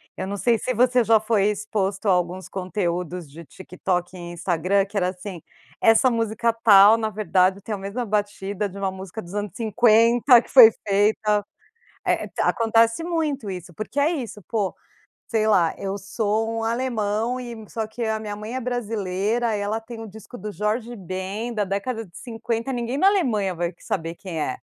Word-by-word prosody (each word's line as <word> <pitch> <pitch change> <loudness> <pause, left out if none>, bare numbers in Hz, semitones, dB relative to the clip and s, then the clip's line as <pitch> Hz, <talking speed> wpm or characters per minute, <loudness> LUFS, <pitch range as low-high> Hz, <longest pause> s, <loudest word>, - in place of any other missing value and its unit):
Eu 190 - -4
não 200 +1 -4
sei 235 +3 +2
se 255 - -2
você 250 +1 +3
já 225 0 +5
foi 215 -2 +1
exposto 205 -1 -1
a - - +5
alguns 180 +1 -1
conteúdos 180 -3 -3
de 160 +4 -11
TikTok 180 +2 -4
e - - -9
Instagram, 180 +3 +1
que 200 +2 -17
era 180 -2 +2
assim: 185 -1 -8 0.4
“Essa 225 +3 +5
música 230 0 0
tal, 205 0 +8
na 220 -1 -1
verdade 195 -3 +1
tem 215 - -5
a - - -2
mesma 200 +6 -4
batida 205 -1 -2
de 195 - -11
uma 195 -1 -1
música 190 +2 -8
dos 175 0 -12
anos 205 -1 -3
50, 235 +2 +5
que - - -18
foi 235 -4 +10 0.2
feita” 210 +1 +2 0.7
eh - - +1
eh, - - -8
ta - - 0
acontece 230 +4 +2
muito 310 -8 -2
isso, 180 -2 -8
porque 215 - -4
é 295 +3 +3
isso, 250 -10 -5
pô, 205 -4 -1 0.5
sei 220 -2 +1
lá: 175 -6 +3
“Eu 195 0 -3
sou 215 +2 -1
um - - -3
alemão 230 0 -1
e 240 -2 -7
só 220 -1 -3
que 225 +2 -6
a 220 -1 -1
minha 210 -1 -5
mãe 210 +3 -7
é - - -1
brasileira, 225 -2 -1
ela 205 +2 -2
tem 225 0 -9
o 225 - -7
disco 220 +4 -11
do 210 -2 -6
Jorge 220 +4 -2
Ben, 190 +5 -4
da 210 -2 0
década 215 +4 -3
de 175 -3 -15
50”, 230 +1 -4
ninguém 240 +2 -2
na 375 - +4
Alemanha 230 - +1
vai 170 0 -2
que 170 - -26
saber 165 -1 -3
quem 170 -4 -5
é. 130 - -2
210 Hz, 190 wpm, -23 LUFS, 190-230 Hz, 0.7 s, foi